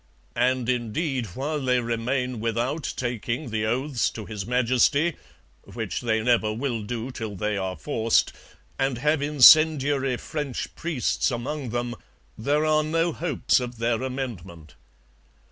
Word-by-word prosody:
And 125 Hz, -1 st, +1 dB
indeed 125 Hz, +2 st, -1 dB
while 150 Hz, +3 st, -2 dB
they 125 Hz, -1 st, +2 dB
remain 120 Hz, +1 st, -2 dB
without 120 Hz, +7 st, -1 dB
taking 120 Hz, +2 st, -3 dB
the 110 Hz, 0 st, -1 dB
oaths 130 Hz, +2 st, 0 dB
to 110 Hz, -, -8 dB
His 105 Hz, -2 st, -6 dB
Majesty 130 Hz, +6 st, +2 dB, 0.5 s
(which -, -, -5 dB
they 110 Hz, -2 st, 0 dB
never 115 Hz, -3 st, +2 dB
will 120 Hz, 0 st, -2 dB
do 115 Hz, +4 st, -4 dB
till 110 Hz, -5 st, -5 dB
they 105 Hz, +3 st, -1 dB
are 95 Hz, -2 st, -3 dB
forced) 110 Hz, +10 st, +1 dB, 0.5 s
and 135 Hz, -2 st, 0 dB
have 150 Hz, +3 st, +1 dB
incendiary 145 Hz, -2 st, +5 dB
French 150 Hz, -4 st, -4 dB
priests 160 Hz, -6 st, -1 dB
among 130 Hz, +2 st, -4 dB
them 120 Hz, +1 st, -2 dB, 0.4 s
there 145 Hz, +7 st, +1 dB
are 155 Hz, 0 st, +3 dB
no 165 Hz, +2 st, 0 dB
hopes 150 Hz, -8 st, +1 dB
of 125 Hz, -1 st, -6 dB
their 115 Hz, 0 st, 0 dB
amendment. 100 Hz, -, -6 dB
125 Hz, 135 wpm, -25 LUFS, 115-140 Hz, 0.5 s, incendiary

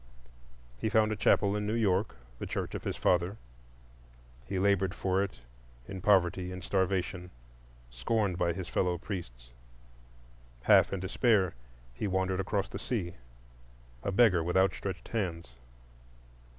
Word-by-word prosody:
He 110 Hz, -, 0 dB
found 110 Hz, 0 st, +3 dB
a -, -, 0 dB
chapel 100 Hz, -1 st, +3 dB
in 105 Hz, 0 st, -2 dB
New 110 Hz, -, 0 dB
York,—the 90 Hz, -, -1 dB
church -, -, -3 dB
of -, -, -6 dB
his -, -, -2 dB
father; 90 Hz, +3 st, +1 dB, 1.1 s
he 100 Hz, -, -2 dB
labored 95 Hz, -1 st, +2 dB
for 95 Hz, 0 st, +1 dB
it 95 Hz, -11 st, -4 dB, 0.5 s
in 95 Hz, -1 st, -6 dB
poverty 90 Hz, -2 st, +3 dB
and 90 Hz, 0 st, -7 dB
starvation, 95 Hz, -1 st, -1 dB, 0.6 s
scorned 95 Hz, -, 0 dB
by 85 Hz, 0 st, +1 dB
his 90 Hz, 0 st, -5 dB
fellow 90 Hz, 0 st, 0 dB
priests. 60 Hz, -, -7 dB, 1.1 s
Half -, -, +6 dB
in 95 Hz, -, -3 dB
despair, 95 Hz, -1 st, +2 dB, 0.4 s
he 100 Hz, -, -3 dB
wandered 95 Hz, 0 st, 0 dB
across 100 Hz, +1 st, -1 dB
the -, -, -7 dB
sea, 95 Hz, -9 st, -3 dB, 0.9 s
a 100 Hz, -, -2 dB
beggar 95 Hz, -5 st, +4 dB
with 90 Hz, +2 st, 0 dB
outstretched 95 Hz, -1 st, 0 dB
hands. 85 Hz, -, -3 dB
95 Hz, 135 wpm, -30 LUFS, 90-100 Hz, 1.1 s, Half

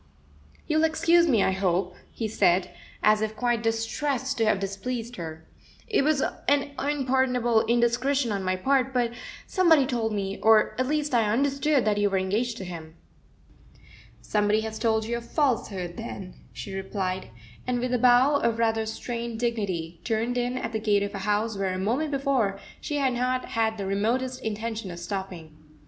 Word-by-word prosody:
"You'll 310 Hz, +1 st, +1 dB
excuse 335 Hz, +2 st, +4 dB
me, 230 Hz, -9 st, +3 dB
I -, -, +2 dB
hope," 185 Hz, -1 st, 0 dB, 0.2 s
he 225 Hz, -, -3 dB
said, 185 Hz, -4 st, +2 dB, 0.3 s
as 215 Hz, 0 st, +4 dB
if 220 Hz, 0 st, -2 dB
quite 240 Hz, 0 st, 0 dB
distressed 255 Hz, +4 st, -1 dB
to 225 Hz, -, +3 dB
have 215 Hz, -2 st, +2 dB
displeased 230 Hz, +5 st, -4 dB
her. 160 Hz, -2 st, -7 dB, 0.4 s
"It 425 Hz, -, +2 dB
was 295 Hz, -2 st, +2 dB, 0.2 s
an 285 Hz, 0 st, +2 dB
unpardonable 260 Hz, -5 st, +1 dB
indiscretion 240 Hz, +2 st, +2 dB
on 200 Hz, -1 st, -1 dB
my 185 Hz, 0 st, 0 dB
part, 265 Hz, +5 st, +1 dB
but 240 Hz, -2 st, +2 dB, 0.3 s
somebody 330 Hz, -7 st, +4 dB
told 235 Hz, -4 st, -1 dB
me, 195 Hz, -1 st, -3 dB
or 220 Hz, -1 st, +5 dB
at 255 Hz, -, +1 dB
least 300 Hz, -1 st, -1 dB
I 225 Hz, -3 st, +3 dB
understood, 275 Hz, +2 st, +2 dB
that 210 Hz, -1 st, +2 dB
you 205 Hz, 0 st, +3 dB
were 195 Hz, -, 0 dB
engaged 215 Hz, +6 st, -1 dB
to 190 Hz, -, -6 dB
him." 165 Hz, -2 st, -8 dB, 1.3 s
"Somebody 210 Hz, 0 st, +1 dB
has 220 Hz, 0 st, -5 dB
told 220 Hz, -1 st, +1 dB
you 235 Hz, +1 st, -2 dB
a -, -, -6 dB
falsehood, 225 Hz, -, -1 dB
then," 195 Hz, -5 st, -7 dB, 0.2 s
she 200 Hz, -, -7 dB
replied, 190 Hz, -, -3 dB, 0.4 s
and, 250 Hz, -1 st, 0 dB
with 250 Hz, +1 st, -2 dB
a 250 Hz, -, +2 dB
bow 255 Hz, +4 st, +5 dB
of 230 Hz, -4 st, 0 dB
rather 225 Hz, -1 st, +1 dB
strained 235 Hz, 0 st, -4 dB
dignity 190 Hz, -8 st, -2 dB
turned 230 Hz, +2 st, -1 dB
in 245 Hz, +1 st, -1 dB
at 245 Hz, -, -3 dB
the 220 Hz, -, -2 dB
gate 205 Hz, -2 st, +2 dB
of 200 Hz, -, -4 dB
a 200 Hz, -, -4 dB
house 210 Hz, +1 st, +1 dB
where 195 Hz, -1 st, -1 dB
a -, -, -3 dB
moment 240 Hz, +11 st, 0 dB
before 270 Hz, -8 st, 0 dB, 0.2 s
she 295 Hz, -, -3 dB
had 270 Hz, -3 st, +1 dB
not 255 Hz, +1 st, -1 dB
had 220 Hz, -2 st, 0 dB
the 200 Hz, -, -4 dB
remotest 240 Hz, +6 st, -1 dB
intention 220 Hz, -1 st, -4 dB
of 175 Hz, -, -7 dB
stopping. 175 Hz, -3 st, -6 dB
225 Hz, 175 wpm, -26 LUFS, 200-255 Hz, 1.3 s, or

